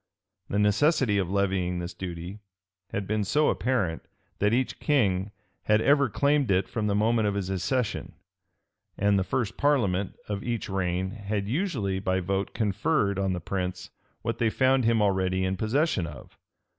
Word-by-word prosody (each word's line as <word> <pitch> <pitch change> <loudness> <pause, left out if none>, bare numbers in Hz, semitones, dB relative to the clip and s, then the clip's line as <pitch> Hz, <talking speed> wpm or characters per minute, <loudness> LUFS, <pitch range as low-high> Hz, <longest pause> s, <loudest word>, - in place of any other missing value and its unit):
The 100 - -1
necessity 105 +1 +3
of 90 -3 -1
levying 95 -2 0
this 90 +1 -5
duty 90 +2 -6 0.5
had 100 - -3
been 105 +1 0
so 145 +10 +2
apparent, 110 -11 0 0.4
that 105 +1 +3
each 125 +2 0
king 100 -10 +1 0.4
had 105 0 +4
ever 140 +2 +4
claimed 140 +2 +2
it 95 0 +2
from 110 -2 -2
the 100 - +1
moment 110 +1 +2
of 100 - -1
his 95 -2 -2
accession; 115 +5 -1 0.8
and 100 -1 +3
the - - +1
first 110 +2 -2
parliament 100 -10 +1
of 100 -1 -3
each 120 -1 -3
reign 95 -1 -1
had 100 -1 -3
usually 120 - -1
by 95 -1 0
vote 95 +2 -2
conferred 105 - +1
on 95 -1 0
the 90 - -2
prince 90 +1 -4 0.3
what - - -2
they 115 - +3
found 130 +1 +2
him 115 -2 +3
already 95 -2 +1
in 95 +1 0
possession 110 - 0
of. 75 -4 -11
100 Hz, 165 wpm, -27 LUFS, 95-115 Hz, 0.8 s, had